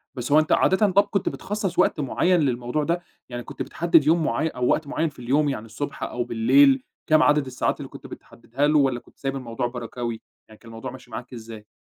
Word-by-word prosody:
بس 125 Hz, +2 st, -5 dB
هو 155 Hz, -, +7 dB
أنت 155 Hz, -, -1 dB
عادةً 200 Hz, +2 st, +4 dB
طَب 200 Hz, +2 st, +5 dB
كنت 200 Hz, -, -1 dB
بتخصَّص 200 Hz, -3 st, -4 dB
وقت -, -, +3 dB
معيّن 175 Hz, +6 st, +2 dB
للموضوع 125 Hz, +1 st, -1 dB
ده؟ 170 Hz, +3 st, -1 dB, 0.3 s
يعني 120 Hz, -1 st, -5 dB
كنت -, -, -9 dB
بتحدِّد 165 Hz, -3 st, +2 dB
يوم 165 Hz, +1 st, +4 dB
معيّن 155 Hz, +4 st, 0 dB
أو 125 Hz, 0 st, -1 dB
وقت 155 Hz, -, +1 dB
معيّن 160 Hz, +2 st, -1 dB
في 140 Hz, -, -18 dB
اليوم، 140 Hz, +5 st, +1 dB
يعني 115 Hz, -5 st, -4 dB
الصبح 140 Hz, +6 st, -6 dB
أو 120 Hz, -, -2 dB
بالليل، 130 Hz, +3 st, +4 dB, 0.2 s
كام 155 Hz, 0 st, +5 dB
عدد 145 Hz, -1 st, +3 dB
الساعات 130 Hz, -1 st, -1 dB
اللي -, -, -7 dB
كنت -, -, -11 dB
بتحدّدها 135 Hz, +5 st, -3 dB
له، 150 Hz, 0 st, +3 dB
والّا 130 Hz, -3 st, +1 dB
كنت -, -, -24 dB
سايب 135 Hz, 0 st, -3 dB
الموضوع 120 Hz, -2 st, -3 dB
بركَاوي؟ 120 Hz, -1 st, -5 dB, 0.3 s
يعني 110 Hz, -, -16 dB
كان 115 Hz, -, -15 dB
الموضوع 115 Hz, +3 st, -7 dB
ماشي 130 Hz, -2 st, -13 dB
معاك 125 Hz, +3 st, -7 dB
إزاي؟ 110 Hz, -2 st, -10 dB
135 Hz, 220 wpm, -24 LUFS, 120-155 Hz, 0.3 s, هو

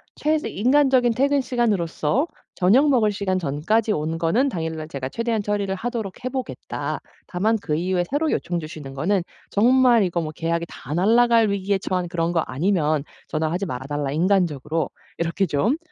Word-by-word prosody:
최대 305 Hz, 0 st, 0 dB
인간적인 255 Hz, +1 st, +3 dB
퇴근시간으로서 245 Hz, -, +1 dB, 0.3 s
저녁 235 Hz, +11 st, +4 dB
먹을 230 Hz, -6 st, +3 dB
시간 190 Hz, -2 st, -1 dB
전까지 185 Hz, +9 st, 0 dB
온 160 Hz, 0 st, -2 dB
거는 195 Hz, +12 st, +2 dB
당일날 160 Hz, -5 st, -4 dB
제가 135 Hz, -4 st, -4 dB
최대한 230 Hz, -, -1 dB
처리를 205 Hz, -1 st, -1 dB
하도록 225 Hz, -2 st, -4 dB
해 -, -, 0 dB
보겠다. 260 Hz, -1 st, -4 dB, 0.3 s
다만 215 Hz, +5 st, +1 dB
그 150 Hz, -, -1 dB
이후에 180 Hz, +2 st, 0 dB
새로 300 Hz, +3 st, 0 dB
요청 175 Hz, -1 st, -1 dB
주시는 155 Hz, -4 st, -8 dB
거는 175 Hz, +7 st, 0 dB, 0.3 s
정말 240 Hz, +1 st, +4 dB
이거 175 Hz, -2 st, 0 dB
뭐 155 Hz, -1 st, -4 dB
계약이 165 Hz, +2 st, -2 dB
다 140 Hz, -, -8 dB
날라갈 230 Hz, +5 st, +4 dB
위기에 200 Hz, 0 st, 0 dB
처한 185 Hz, -2 st, -2 dB
그런 170 Hz, 0 st, -1 dB
거 165 Hz, -, +2 dB
아니면 155 Hz, 0 st, 0 dB, 0.2 s
전화하지 160 Hz, +4 st, -1 dB
말아 130 Hz, -5 st, -5 dB
달라 145 Hz, -1 st, -2 dB
인간적으로. 165 Hz, -3 st, +1 dB, 0.3 s
이렇게 170 Hz, +4 st, 0 dB
좀 190 Hz, -, +1 dB
190 Hz, 370 characters per minute, -23 LUFS, 160-230 Hz, 0.3 s, 저녁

